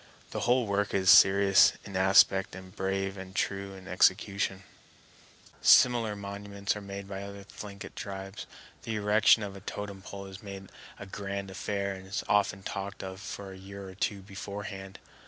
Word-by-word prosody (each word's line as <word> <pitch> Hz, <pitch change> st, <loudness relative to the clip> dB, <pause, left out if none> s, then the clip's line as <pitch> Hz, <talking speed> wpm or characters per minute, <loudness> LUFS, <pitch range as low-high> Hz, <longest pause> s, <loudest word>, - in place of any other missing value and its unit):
The -, -, -3 dB
whole 125 Hz, 0 st, +4 dB
work 100 Hz, 0 st, 0 dB
is 95 Hz, -1 st, +5 dB
serious 95 Hz, -1 st, +7 dB
in 100 Hz, -, -8 dB
aspect 95 Hz, 0 st, +4 dB
and 95 Hz, -1 st, -11 dB
brave 95 Hz, +1 st, -2 dB
and 95 Hz, 0 st, -9 dB
true 95 Hz, 0 st, -2 dB
in 95 Hz, 0 st, -12 dB
execution. 95 Hz, +1 st, +2 dB, 1.0 s
Similar 120 Hz, -4 st, +5 dB
monuments 100 Hz, 0 st, -4 dB
are 105 Hz, -, -6 dB
made 100 Hz, 0 st, -7 dB
by 100 Hz, -1 st, -6 dB
other 100 Hz, 0 st, -8 dB
Thlinkit 100 Hz, 0 st, -9 dB
tribes. 95 Hz, 0 st, -7 dB, 0.3 s
The 110 Hz, -, -4 dB
erection 105 Hz, +1 st, +4 dB
of 100 Hz, -1 st, -6 dB
a 100 Hz, -, -10 dB
totem 100 Hz, -1 st, -6 dB
pole 100 Hz, 0 st, -8 dB
is 95 Hz, 0 st, -10 dB
made 100 Hz, -2 st, -9 dB, 0.3 s
a 100 Hz, -, -8 dB
grand 100 Hz, 0 st, -5 dB
affair, 100 Hz, 0 st, -2 dB
and 95 Hz, 0 st, -10 dB
is 100 Hz, -, -3 dB
often 100 Hz, -1 st, +2 dB
talked 100 Hz, +1 st, -5 dB
of 95 Hz, 0 st, -7 dB
for 100 Hz, 0 st, -7 dB
a -, -, -11 dB
year 100 Hz, 0 st, -9 dB
or 95 Hz, -, -9 dB
two 100 Hz, +1 st, -2 dB
beforehand. 100 Hz, 0 st, -7 dB
100 Hz, 170 wpm, -29 LUFS, 95-100 Hz, 1.0 s, serious